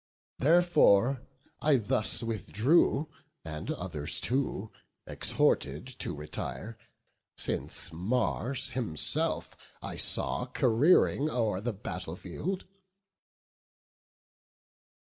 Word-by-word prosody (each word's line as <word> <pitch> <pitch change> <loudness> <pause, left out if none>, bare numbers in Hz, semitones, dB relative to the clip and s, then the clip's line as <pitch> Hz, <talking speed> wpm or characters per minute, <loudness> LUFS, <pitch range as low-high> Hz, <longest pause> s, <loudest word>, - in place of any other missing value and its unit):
Therefore 140 - +4 0.4
I 150 -1 +4
thus 110 -1 +1
withdrew, 125 - +2 0.4
and 80 0 -6
others 80 -5 -3
too 120 -5 -1 0.3
Exhorted 70 - 0
to - - -4
retire, 100 +9 -6 0.6
since 80 - +1
Mars 120 +7 -1
himself 115 - 0 0.2
I - - -6
saw - - 0
careering 140 +4 +3
o'er 110 -8 0
the 120 +1 -2
battle 90 -5 -6
field." 165 - -5
115 Hz, 80 wpm, -30 LUFS, 90-135 Hz, 0.6 s, Therefore